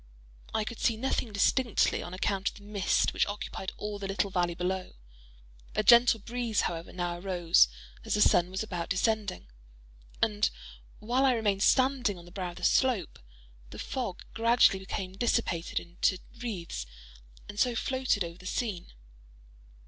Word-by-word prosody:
I 220 - 0
could 230 +1 -7
see 230 - +1
nothing 250 -1 -1
distinctly 230 +3 +2
on 175 - -7
account 195 +1 -1
of - - -16
the 205 - -14
mist 205 -2 +1
which - - +2
occupied 205 -2 -5
all 210 -1 -5
the 195 - -4
little 195 0 -1
valley 175 -2 0
below. 185 +1 -3 0.8
A 215 - +2
gentle 235 +1 +7
breeze, 235 0 -1
however, 165 -1 -3
now 175 -1 -3
arose, 175 - +4 0.4
as - - -1
the 210 - +1
sun 175 0 +4
was 190 +2 -3
about 175 -5 -4
descending; 210 0 0 0.7
and 210 -2 +2 0.5
while 245 +5 0
I 265 -2 +5
remained 205 -4 0
standing 255 -5 +3
on 170 - -12
the 175 - -14
brow 185 -1 -4
of 175 - -10
the - - -11
slope, 245 - +2 0.5
the - - -10
fog 235 -9 -4
gradually 230 -3 +4
became 190 -1 -5
dissipated 190 -5 0
into 175 +2 0 0.2
wreaths, 170 - -4 0.6
and 205 - -7
so 245 -1 +2
floated 260 -5 0
over 170 +1 -8
the 185 - -9
scene. 200 -5 -3
200 Hz, 160 wpm, -29 LUFS, 180-230 Hz, 0.8 s, gentle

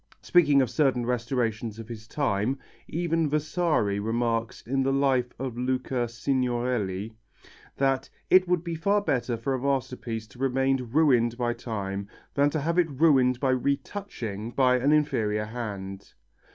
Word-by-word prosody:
Speaking 145 -6 +5
of 125 - -3
certain 130 -5 +2
restorations 115 -3 -1
of 115 -1 -8
his 110 -2 -9
time, 125 -1 0 0.3
even 165 -1 0
Vasari 150 - +1
remarks 115 +1 -1
in 135 +3 0
the 135 0 +1
Life 135 -3 +2
of 130 -2 -4
Luca 125 -1 -1
Signorelli, 120 -5 -1 0.6
that 135 -1 +1 0.2
"it 185 0 +5
would 175 -2 +1
be 170 -1 -4
far 200 +6 +2
better 125 - -1
for 125 +4 -2
a 130 - -2
masterpiece 125 -4 -2
to 110 - -17
remain 135 -1 +1
ruined 125 -6 +3
by 120 -1 0
time 100 -4 -4 0.3
than 145 +1 +3
to 155 0 -2
have 170 +4 +1
it 170 -2 +3
ruined 135 -4 +3
by 135 -1 +2
retouching 130 - -3
by 125 0 +3
an 140 +4 +2
inferior 110 -8 +1
hand." 100 -4 -6
125 Hz, 150 wpm, -27 LUFS, 115-140 Hz, 0.6 s, Speaking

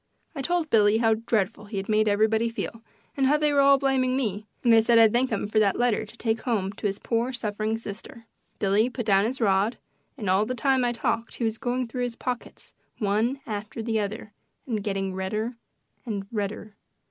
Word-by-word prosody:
I 280 - -4
told 340 +1 -1
Billy 210 -1 +5
how 225 -1 +3
dreadful 220 -1 -1
he 205 0 -6
had 195 - -3
made 215 0 +2
everybody 220 +2 +2
feel 230 0 -5 0.3
and 270 -1 +2
how 295 +2 +4
they 300 -1 +1
were 285 - +3
all 275 0 +6
blaming 265 -2 +1
me, 215 -5 -2 0.2
and 235 -2 +5
I 225 - +8
said 230 +1 +4
I'd 225 -2 +6
thank 250 +2 +2
him 220 -4 -1
for 215 +1 +2
that 200 -3 +2
letter 240 -3 +1
to 230 - -15
take 225 -1 -1
home 205 -6 -1
to 205 - -2
his 195 0 -3
poor 235 +3 -1
suffering 215 -2 -2
sister. 225 +2 -9 0.3
Billy 205 +4 +2
put 245 -2 -5
down 200 -1 +4
his 255 +4 -2
rod, 205 +1 +2 0.4
and 215 -6 -5
all 190 +3 +3
the 255 - -2
time 265 +1 +2
I 240 - +2
talked 230 -1 -2
he - - -4
was 225 -1 -1
going 250 0 -1
through 250 +2 -4
his 245 -1 -2
pockets 245 0 -6 0.2
one 220 +6 0
after 215 +1 -5
the 225 -1 0
other 210 0 -4 0.3
and 220 -5 -2
getting 195 -2 -2
redder 215 +6 -3 0.5
and 205 -5 -4
redder. 210 -1 -4
225 Hz, 210 wpm, -26 LUFS, 210-245 Hz, 0.5 s, I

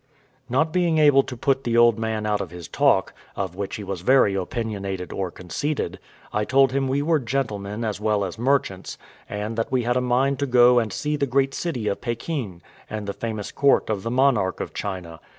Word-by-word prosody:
Not 155 +6 +1
being 175 -3 +2
able 145 -3 +6
to 125 -2 -8
put 135 +2 +1
the 120 -2 0
old 120 -2 +5
man 110 -1 -2
out 105 -1 0
of 95 - -5
his 85 -2 -9
talk, - - +2 0.2
of 95 -3 -3
which 100 +1 -4
he 105 - -6
was 95 -3 -5
very 125 -1 +4
opinionated 95 -2 -3
or 95 -2 -2
conceited, 95 - -3 0.3
I 105 - +1
told 135 +3 +4
him 135 0 0
we 140 +2 0
were 160 0 +2
gentlemen 110 -4 -3
as 105 -2 -3
well 105 -2 +1
as 95 +3 -7
merchants, 120 -7 0 0.3
and 105 +2 -4
that 115 - -2
we 130 -2 +1
had 120 +1 +1
a - - +2
mind 130 +2 +1
to 140 - 0
go 125 -1 +6
and 110 -3 -2
see 150 0 -2
the 140 -1 0
great 135 +1 +1
city 130 -12 -3
of 100 - -1
Pekin, 120 - -4 0.3
and 105 -1 -4
the 100 - -3
famous 110 -2 -5
court 140 -5 +3
of 100 -3 -1
the 115 - -3
monarch 120 -7 +2
of - - -5
China. 90 -5 -5
115 Hz, 210 wpm, -23 LUFS, 100-135 Hz, 0.3 s, able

